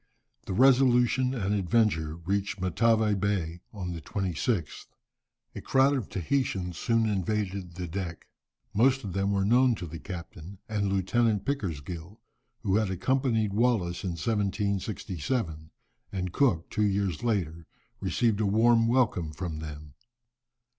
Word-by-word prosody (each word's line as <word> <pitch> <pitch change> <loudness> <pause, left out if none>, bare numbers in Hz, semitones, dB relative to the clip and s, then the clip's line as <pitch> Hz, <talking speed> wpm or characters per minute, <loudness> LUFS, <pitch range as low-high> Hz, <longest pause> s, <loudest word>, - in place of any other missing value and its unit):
The - - -2
Resolution 130 +1 +4
and 100 -4 -1
Adventure 95 -5 +1
reached 95 +3 -2
Matavai 110 +4 +2
Bay 95 -4 -1
on 90 -4 -5
the 85 - -6
26th. 95 - -2 0.7
A - - -7
crowd 135 +1 +3
of 125 -7 -3
Tahitians 95 - -1
soon 115 -1 +2
invaded 100 -3 -2
the 90 -1 -4
deck. 85 -1 -5 0.5
Most 130 +4 +3
of 95 - -5
them 100 +1 0
were 100 -1 +1
known 125 +3 +4
to 90 - -6
the 85 0 -8
captain, 90 0 -8
and 105 -2 -1
Lieutenant 105 +2 +1
Pickersgill, 90 - -4 0.4
who 95 +1 +2
had 110 -3 +1
accompanied 110 +2 +1
Wallis 105 -6 +1
in 90 -3 -2
1767, 100 - -2 0.4
and 90 -2 -3
Cook 105 - +1
two - - -1
years 100 -2 0
later, 85 -8 -1 0.3
received 110 +2 +1
a 105 - +2
warm 115 +2 +4
welcome 115 -10 +1
from 80 0 -5
them. 75 -2 -8
100 Hz, 135 wpm, -28 LUFS, 90-115 Hz, 0.7 s, Resolution